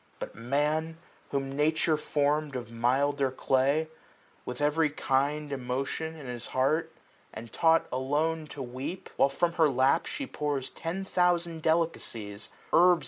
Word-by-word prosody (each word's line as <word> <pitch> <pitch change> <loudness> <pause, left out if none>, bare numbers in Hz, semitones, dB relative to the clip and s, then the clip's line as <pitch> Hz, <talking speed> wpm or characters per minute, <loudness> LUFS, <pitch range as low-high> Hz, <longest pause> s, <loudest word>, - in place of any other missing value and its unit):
But - - -6
Man, 150 +7 0 0.3
whom 135 -1 -2
Nature 155 +2 +2
form'd 150 -1 0
of 120 -3 -5
milder 135 +4 +2
clay. 135 +4 +1 0.6
With 125 0 -5
every 150 +2 +2
kind 145 +1 0
emotion 135 +5 -3
in 150 -3 -10
his 120 -1 -5
heart. 140 +5 +1 0.4
And 115 0 -9
taught 165 0 +4
alon&to 150 +3 -1
weep; 130 +9 -6
while 140 - +4
from 170 +5 0
her 160 -3 +4
lap 135 +5 +3
350 - - -4
She 275 - -3
pours 145 - -2
ten 180 +4 -4
thousand 175 -3 +1
delicacies; 120 -11 -1 0.2
herbs. 175 0 +6
145 Hz, 140 wpm, -29 LUFS, 130-160 Hz, 0.6 s, herbs